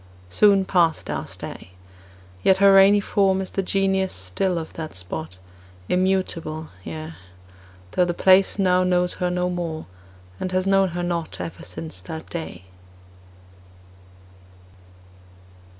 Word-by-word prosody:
—Soon 200 - +4
passed 170 -4 +1
our - - -4
stay; 90 - -9 0.7
Yet 190 - +4
her 200 0 +6
rainy 195 +1 +7
form 195 -1 +2
is 190 - -4
the 195 - -1
Genius 190 0 0
still 95 - -1
of 160 -1 -6
the 160 -1 -6
spot, 90 -1 -6 0.5
Immutable, 180 -4 -1
yea, 80 -1 -7 0.8
Though 180 - +2
the 175 - -1
place 190 +2 +4
now 185 -2 +3
knows 180 -1 +1
her 180 - +1
no 180 0 0
more, 170 -3 -4 0.5
and 185 - -3
has 185 0 +1
known 195 -1 +3
her 175 - -2
not 170 -2 -3
Ever 165 - -6
since 160 -1 -7
that 160 -2 -8
day. 165 - -6
180 Hz, 130 wpm, -23 LUFS, 160-190 Hz, 0.8 s, rainy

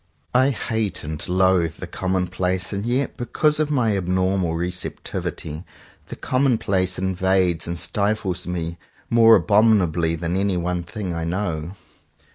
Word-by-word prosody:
I 130 +2 +4
hate 110 -5 -2
and 75 0 -5
loathe 90 -3 +2
the - - -7
commonplace; 95 0 -1
and 100 0 -2
yet 130 +3 -1
because 150 +5 +1
of 155 -1 +1
my 120 -8 +2
abnormal 95 -2 0
receptivity, 85 -2 -4 0.4
the - - -7
commonplace 105 -8 +1
invades 95 -2 +1
and 85 +1 -3
stifles 100 -2 -1
me 85 -1 -4 0.3
more 115 -1 +7
abominably 95 -7 +3
than 85 +2 -3
any 100 -1 +1
one 90 0 -1
thing 95 +1 -5
I 85 0 -3
know. 85 -2 -3
95 Hz, 130 wpm, -22 LUFS, 85-105 Hz, 0.4 s, more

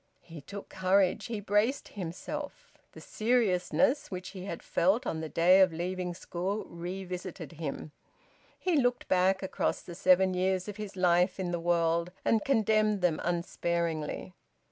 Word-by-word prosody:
He 165 -3 -10
took 200 +8 -9
courage. 190 +2 +2
He 225 -3 -3
braced 210 +7 +1
himself. 190 - -6 0.2
The - - -11
seriousness 240 +4 +1
which 185 -1 -6
he 190 -1 -8
had 170 - -6
felt 190 +7 +2
on 160 - -2
the 160 - -5
day 180 +4 +5
of 185 -2 +5
leaving 180 +1 -3
school 185 +4 -3
revisited 180 +1 -6
him. 155 -2 -6 0.7
He 360 -4 +1
looked 245 0 0
back 190 +1 +2
across 190 - -1
the 175 - -9
seven 185 +1 +4
years 185 +1 0
of 205 0 -6
his 210 -2 -6
life 180 +1 +3
in 180 -2 -2
the 175 - -1
world, 170 0 +1
and 220 -2 +3
condemned 215 -5 +2
them 175 -3 +1
unsparingly. 170 -1 -2
185 Hz, 150 wpm, -30 LUFS, 175-205 Hz, 0.7 s, day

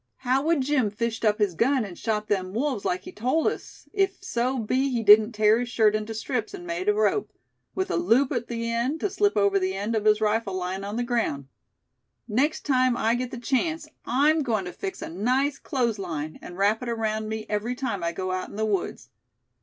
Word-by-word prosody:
How 260 +1 +1
would 315 -1 +2
Jim 260 -5 +1
fished 225 +2 -3
up 210 -1 +3
his 205 -5 +1
gun, 250 - +2
and 185 -3 -8
shot 215 0 -2
them 190 -1 -1
wolves, 255 -4 -1
like 180 +1 -1
he - - -9
told 255 +9 0
us, - - -4
if 390 -2 +1
so 255 -7 -1
be 255 +4 0
he 240 -3 -1
didn't 215 +2 +7
tear 215 +1 +4
his 245 0 -3
shirt 220 -3 +3
into 215 +1 -3
strips, 395 - -3
an' 350 -2 -9
made 350 +4 -2
a - - +5
rope, 425 -1 +1 0.4
with 375 0 -1
a - - +1
loop 280 -5 +3
at 240 -4 -2
the 230 -1 -3
end, 245 +7 -1
to 410 - 0
slip 410 - +1
over 200 -1 +3
the 190 0 -1
end 205 +4 -2
of 215 -1 -1
his 215 0 +5
rifle 215 -2 0
lyin' 185 +1 -3
on 205 +2 -4
the 240 - 0
ground. 225 - -1 0.8
Next 265 +8 0
time 255 -3 +3
I 225 +1 +2
get 245 +1 -2
the 250 - -7
chance 300 +6 -1 0.2
I'm 295 +5 +3
goin' 220 -8 -1
to 180 - -6
fix 390 -1 -5
a - - -5
nice 255 - 0
clothes 240 -7 -1
line, 155 -5 -5
and 175 - -9
wrap 205 +3 +2
it 250 - -4
around 220 -1 -2
me 220 0 -4
every 215 +4 -2
time 230 -8 -3
I 170 - 0
go 185 +1 -3
out 185 0 -3
in - - -11
the 220 +1 0
woods. 200 -4 -2
230 Hz, 225 wpm, -26 LUFS, 210-265 Hz, 0.8 s, didn't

